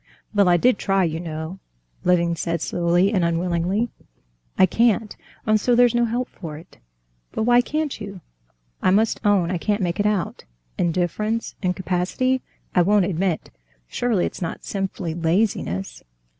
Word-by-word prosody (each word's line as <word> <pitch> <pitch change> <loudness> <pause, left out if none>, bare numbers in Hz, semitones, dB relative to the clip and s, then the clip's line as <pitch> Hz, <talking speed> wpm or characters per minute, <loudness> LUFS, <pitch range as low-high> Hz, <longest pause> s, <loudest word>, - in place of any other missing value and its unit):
"Well, 200 -3 +4
I 175 - +5
did 245 +5 +3
try, 195 -1 +2
you 160 -1 -1
know," 160 +2 -6 0.4
Levin 170 -1 +2
said 170 0 -2
slowly 175 +5 +1
and 185 -4 +2
unwillingly. 175 +6 0 0.7
"I - - +7
can't! 225 +2 +1 0.3
and 215 -1 +3
so 245 +2 +3
there's 245 -1 +5
no 240 0 +3
help 240 +2 -1
for 155 -5 -8
it." 165 +4 -16 0.5
"But - - -1
why 240 +1 +5
can't 300 -1 -3
you? 200 -3 -7 0.6
I - - +3
must 215 +4 +2
own 195 -5 +3
I 180 - -1
can't 205 +3 0
make 175 +1 -1
it 205 - +3
out. 205 -4 -1 0.3
Indifference, 185 +6 -1
incapacity—I 185 +4 -1
won't 200 +1 +4
admit; 180 -2 -1 0.4
surely 230 - 0
it's - - -6
not 165 - -4
simply 190 -4 -3
laziness?" 165 - -1
190 Hz, 150 wpm, -23 LUFS, 170-215 Hz, 0.7 s, I